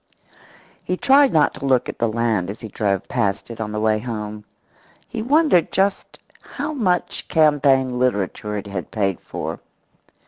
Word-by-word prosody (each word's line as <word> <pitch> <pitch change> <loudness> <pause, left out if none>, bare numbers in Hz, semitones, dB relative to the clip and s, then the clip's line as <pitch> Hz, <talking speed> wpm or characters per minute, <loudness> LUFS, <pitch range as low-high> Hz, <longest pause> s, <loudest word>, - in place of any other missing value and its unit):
He 180 - -2
tried 270 +3 +5
not 155 -2 +3
to - - -7
look 130 -2 +2
at - - -7
the 115 - +2
land 110 -5 0
as 105 - -6
he 110 - -7
drove 100 -2 -1
past 100 +3 -1
it 115 -1 -7
on 105 -1 -3
the 105 - -3
way 110 0 +2
home. 105 -2 -6 0.6
He - - -5
wondered 280 - +3
just 195 +1 0 0.2
how 295 +2 -5
much 185 - -1
campaign 140 -5 +3
literature 105 -3 -1
it 100 - -5
had 100 -3 -5
paid 100 -4 -1
for. - - -5
120 Hz, 165 wpm, -21 LUFS, 105-175 Hz, 0.6 s, tried